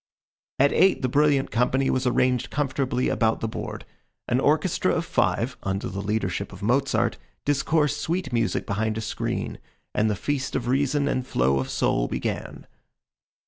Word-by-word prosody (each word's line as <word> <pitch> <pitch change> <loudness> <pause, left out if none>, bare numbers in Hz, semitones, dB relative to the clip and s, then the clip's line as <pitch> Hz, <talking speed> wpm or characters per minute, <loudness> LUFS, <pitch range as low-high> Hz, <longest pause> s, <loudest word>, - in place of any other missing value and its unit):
At 140 +2 +4
eight 190 -6 +4
the - - +3
brilliant 140 +1 +2
company 125 +4 +2
was 130 0 0
arranged 125 0 +2
comfortably 135 -3 0
about 110 -1 +1
the 115 - -2
board. 110 - -6 0.4
An - - +2
orchestra - - +2
of - - -1
five, 125 +2 0
under 95 0 -2
the 100 +1 -4
leadership 100 -2 -2
of 95 +1 -10
Mozart, 135 +5 +1 0.3
discoursed 145 +1 +1
sweet 175 -3 -2
music 115 -2 0
behind 110 +2 -1
a - - -2
screen, 110 - -3 0.3
and 110 +1 +2
the 105 - 0
feast 130 +5 -2
of 120 - -1
reason 140 +2 +1
and 130 -2 -1
flow 65 +2 +2
of 65 - -3
soul - - +1
began. - - -4
125 Hz, 160 wpm, -25 LUFS, 110-140 Hz, 0.4 s, At